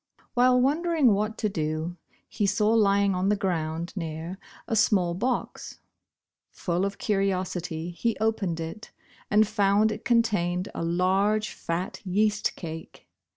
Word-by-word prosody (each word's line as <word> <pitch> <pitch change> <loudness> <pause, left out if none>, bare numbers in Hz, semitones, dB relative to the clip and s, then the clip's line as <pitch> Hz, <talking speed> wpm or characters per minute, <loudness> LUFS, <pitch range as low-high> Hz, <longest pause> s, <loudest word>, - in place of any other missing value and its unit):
While 250 0 +4
wondering 300 -1 +3
what 215 +2 -1
to 215 - 0
do, 160 -2 -2 0.3
he 205 - -1
saw 210 +2 +2
lying 200 -3 +3
on 185 +2 0
the 210 - +3
ground 170 -3 -2
near, 165 +1 -5 0.3
a 225 - 0
small 195 -5 +3
box. 240 +7 -3 0.7
Full 180 +1 -1
of 200 0 -4
curiosity 185 -4 -1
he 230 +6 -1
opened 210 -6 0
it 165 +6 -6 0.4
and 210 +1 +4
found 210 0 +3
it 210 - -6
contained 205 -6 +1
a - - -3
large 195 +5 +1
fat 170 +2 -4
yeast 210 +2 +1
cake. 160 -2 -9
195 Hz, 135 wpm, -26 LUFS, 175-215 Hz, 0.7 s, While